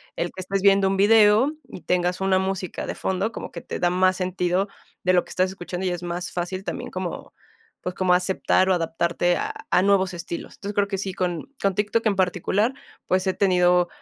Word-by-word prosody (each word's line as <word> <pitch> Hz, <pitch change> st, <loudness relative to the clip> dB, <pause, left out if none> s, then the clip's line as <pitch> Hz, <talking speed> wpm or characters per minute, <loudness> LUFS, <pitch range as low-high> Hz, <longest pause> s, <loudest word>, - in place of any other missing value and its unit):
el 175 Hz, -, -1 dB
que 185 Hz, -, -7 dB
estés 195 Hz, +1 st, -2 dB
viendo 195 Hz, 0 st, +5 dB
un 195 Hz, -, +1 dB
video 215 Hz, +5 st, +5 dB, 0.2 s
y -, -, -9 dB
tengas 180 Hz, +1 st, 0 dB
una 190 Hz, -1 st, +3 dB
música 190 Hz, -1 st, -3 dB
de -, -, -2 dB
fondo, 190 Hz, +4 st, -1 dB
como -, -, -7 dB
que 170 Hz, -, -7 dB
te -, -, -6 dB
da 175 Hz, -, +2 dB
más 185 Hz, +1 st, +2 dB
sentido 185 Hz, +1 st, 0 dB, 0.4 s
de 185 Hz, -, +3 dB
lo 180 Hz, -, +4 dB
que -, -, -13 dB
estás 185 Hz, 0 st, +1 dB
escuchando 185 Hz, -1 st, -5 dB
y -, -, +2 dB
es 175 Hz, -1 st, -4 dB
más 175 Hz, 0 st, -4 dB
fácil 180 Hz, +2 st, -3 dB
también -, -, -5 dB
como, -, -, -5 dB, 0.5 s
pues, 180 Hz, -, -4 dB
como 185 Hz, -1 st, +2 dB
aceptar 185 Hz, +1 st, +2 dB
o -, -, +5 dB
adaptarte 170 Hz, +1 st, 0 dB
a -, -, -2 dB, 0.2 s
a 180 Hz, -, +5 dB
nuevos 190 Hz, -1 st, +2 dB
estilos. 170 Hz, 0 st, -6 dB
Entonces, 200 Hz, +1 st, -6 dB
creo 205 Hz, 0 st, +2 dB
que 195 Hz, -1 st, -3 dB
sí, 195 Hz, -1 st, -3 dB
con 180 Hz, -, -3 dB
con 195 Hz, -1 st, +2 dB
TikTok 210 Hz, +3 st, 0 dB
en 205 Hz, -, +2 dB
particular, 190 Hz, +5 st, +1 dB, 0.3 s
pues, 185 Hz, +1 st, +1 dB
he 190 Hz, -, +2 dB
tenido 180 Hz, -2 st, +3 dB
185 Hz, 215 wpm, -24 LUFS, 180-195 Hz, 0.5 s, viendo